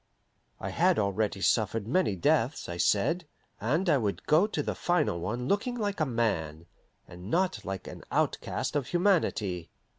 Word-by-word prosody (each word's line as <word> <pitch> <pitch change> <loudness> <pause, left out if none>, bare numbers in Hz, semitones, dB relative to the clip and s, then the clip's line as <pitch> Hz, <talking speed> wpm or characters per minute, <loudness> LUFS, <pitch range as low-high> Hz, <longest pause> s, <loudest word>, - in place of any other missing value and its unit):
I - - -4
had - - +3
already 100 -1 0
suffered 110 0 +1
many 150 - +2
deaths, 85 - +1
I 85 - -5
said, 145 - +1 0.3
and 150 - 0
I 150 -5 +4
would 105 -4 -2
go 160 +7 +4
to - - -2
the - - -2
final 155 - 0
one 120 +8 -3
looking 230 - 0
like 205 -5 -2
a 155 - +1
man, 85 - -1 0.4
and 90 +3 -10
not 185 +6 0
like 95 -1 -5
an - - -9
outcast - - -1
of 140 -4 0
humanity. 155 - +1
120 Hz, 160 wpm, -29 LUFS, -, 0.4 s, I